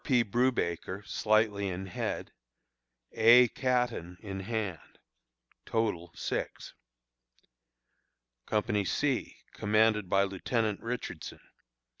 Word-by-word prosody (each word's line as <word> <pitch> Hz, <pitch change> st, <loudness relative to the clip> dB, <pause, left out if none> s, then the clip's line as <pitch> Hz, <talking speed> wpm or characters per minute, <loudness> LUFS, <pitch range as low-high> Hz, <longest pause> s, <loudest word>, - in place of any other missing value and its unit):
P. 125 Hz, -5 st, +3 dB
Brewbaker, 105 Hz, -5 st, 0 dB
slightly 105 Hz, -2 st, +1 dB
in 95 Hz, +1 st, -4 dB
head; 95 Hz, -, -4 dB, 0.8 s
A. 120 Hz, +2 st, +7 dB
Caton, 125 Hz, -10 st, -1 dB
in 95 Hz, -2 st, -5 dB
hand. 100 Hz, -5 st, -4 dB, 0.7 s
Total, 100 Hz, -7 st, -1 dB
6. -, -, -4 dB, 1.7 s
Company 105 Hz, -1 st, +1 dB
C, 130 Hz, +8 st, -1 dB, 0.2 s
commanded 105 Hz, -2 st, +2 dB
by 95 Hz, +1 st, +4 dB
Lieutenant 105 Hz, +2 st, -1 dB
Richardson. 115 Hz, -9 st, -5 dB
105 Hz, 85 wpm, -30 LUFS, 95-115 Hz, 1.7 s, A